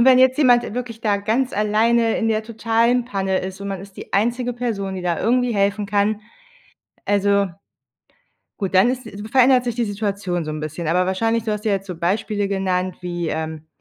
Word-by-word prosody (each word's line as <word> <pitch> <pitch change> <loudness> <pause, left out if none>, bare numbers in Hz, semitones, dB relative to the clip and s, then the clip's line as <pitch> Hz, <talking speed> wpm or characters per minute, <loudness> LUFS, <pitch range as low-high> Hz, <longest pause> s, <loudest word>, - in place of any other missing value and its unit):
und 235 - +5
wenn 255 -1 +7
jetzt 260 +2 +4
jemand, 245 -4 +5
äh, - - -6
wirklich 235 -2 -5
da 210 -3 +1
ganz 225 +6 0
alleine 225 +2 +2
in 225 -2 0
der 220 0 +1
totalen 230 +2 +1
Panne 195 -4 -1
ist 190 +1 -6
und 200 - -5
man 195 -2 -4
ist 195 -1 -13
die - - -10
einzige 240 +4 +1
Person, 215 -6 -3
die 185 - -5
da 175 -2 0
irgendwie 245 0 +2
helfen 200 +1 +1
kann, 205 +1 +1 0.9
also 200 0 +2 1.1
gut, 195 -2 -2
dann 190 +6 +5
ist 255 -1 -3 0.3
verändert 255 -1 +5
sich 240 - -2
die 240 - 0
Situation 200 -5 -2
so 155 - -4
'n 155 - -5
bisschen. 155 +2 -5
Aber 180 +2 +2
wahrscheinlich 225 +4 0
du 220 - -2
hast 210 +1 -4
ja 210 - +2
jetzt 195 0 -3
so 180 - -5
Beispiele 200 +4 -1
genannt, 185 -2 -1
wie, 175 -2 -3
ähm, 160 0 -4
205 Hz, 205 wpm, -21 LUFS, 190-235 Hz, 1.1 s, wenn